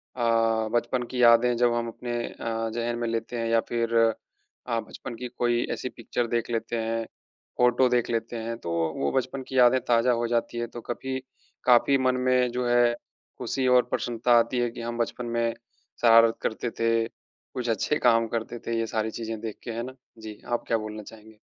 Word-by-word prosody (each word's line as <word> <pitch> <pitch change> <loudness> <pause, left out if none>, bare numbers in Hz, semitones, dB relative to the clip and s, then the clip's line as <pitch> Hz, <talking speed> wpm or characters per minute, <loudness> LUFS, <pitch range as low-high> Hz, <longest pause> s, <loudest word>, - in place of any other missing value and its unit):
अ, 115 -2 +2
बचपन 120 +1 0
की 125 -1 -1
यादें 120 +1 +6
जब 120 -1 +3
हम 120 0 -1
अपने 120 +1 -6 0.2
अ, 115 0 -3
ज़ेहन 120 0 -2
में 120 - -1
लेते 115 +1 -3
हैं 115 - -1
या 115 0 +4
फिर 115 -1 -1 0.7
अ, 115 -2 0
बचपन 120 +1 -8
की 125 +2 -6
कोई 120 0 +1
ऐसी 130 - -4
पिक्चर 120 +1 -3
देख 115 0 -1
लेते 115 0 -2
हैं, 115 0 -2 0.5
फोटो 125 +1 +4
देख 125 -1 +1
लेते 115 0 -2
हैं, 115 0 -4
तो 85 -7 -6
वो 85 -1 0
वो - - +1
बचपन 130 +1 -2
की 130 - -4
यादें 125 +1 +6
ताज़ा 120 +1 +4
हो 120 - 0
जाती 120 0 -1
है, 120 0 -2
तो 120 +1 -9
कभी 130 +3 -4 0.4
काफ़ी 125 +3 +5
मन 130 -1 +2
में 125 -1 +3
जो 125 0 -2
है 120 0 +4 0.4
खुशी 130 -1 -1
और 125 -1 +5
प्रसन्नता 120 0 +2
आती 115 +2 0
है 120 0 +1
कि 115 - -8
हम 120 0 -4
बचपन 120 +1 -2
में 115 0 0 0.5
शरारत 115 -1 +6
करते 115 +2 -2
थे, 115 0 +2
कुछ 125 +1 -9
अच्छे 115 +7 +1
काम 115 -2 +4
करते 115 +1 -4
थे, 115 0 0
ये 115 - 0
सारी 110 0 -2
चीज़ें 115 -1 -5
देख 110 -2 -5
के 120 - -5
है 115 +1 -3
ना? 130 +1 -8 0.2
जी, 110 -1 -9
आप 120 -1 -1
क्या 115 - +2
बोलना 110 0 -6
चाहेंगे? 110 0 -14
120 Hz, 205 wpm, -26 LUFS, 115-120 Hz, 0.7 s, यादें